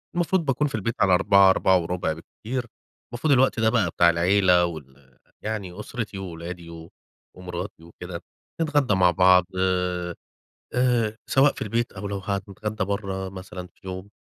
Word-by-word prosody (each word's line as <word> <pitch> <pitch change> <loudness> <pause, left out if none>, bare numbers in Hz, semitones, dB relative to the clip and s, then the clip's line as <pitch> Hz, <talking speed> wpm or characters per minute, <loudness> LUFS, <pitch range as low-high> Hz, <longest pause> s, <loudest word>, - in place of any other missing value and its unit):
المفروض 175 0 +1
باكون 140 +2 +1
في 135 - -4
البيت 110 +2 -2
على 95 -2 +4
16:00 100 +1 +5
16:15 90 -3 +2
بالكتير. 120 +9 -6 0.5
المفروض 140 +5 +2
الوقت 130 -2 +3
ده 110 0 +4
بقى 110 -6 +2
بتاع 85 +1 +4
العيلة 90 +1 +4
وال 70 -5 -10 0.2
يعني 105 -3 -5
أُسرتي 105 -2 -5
وولادي 85 -2 -7
و 80 0 -10 0.5
ومراتي 90 -1 -7
وكده، 85 +1 -8 0.4
نتغدى 145 -8 +2
مع 90 -2 +4
بعض، 90 -1 +5
آآ 90 -2 0 0.6
آآ، 120 -3 +2
سواء 135 +2 +5
في - - -7
البيت 115 +3 -1
أو 100 +1 -6
لو 100 0 -3
هنتغدى 100 +2 -3
برّه 95 -1 -3
مثلًا 95 -1 -8
في - - -27
يوم. 95 +2 -6
95 Hz, 150 wpm, -24 LUFS, 90-110 Hz, 0.6 s, 16:00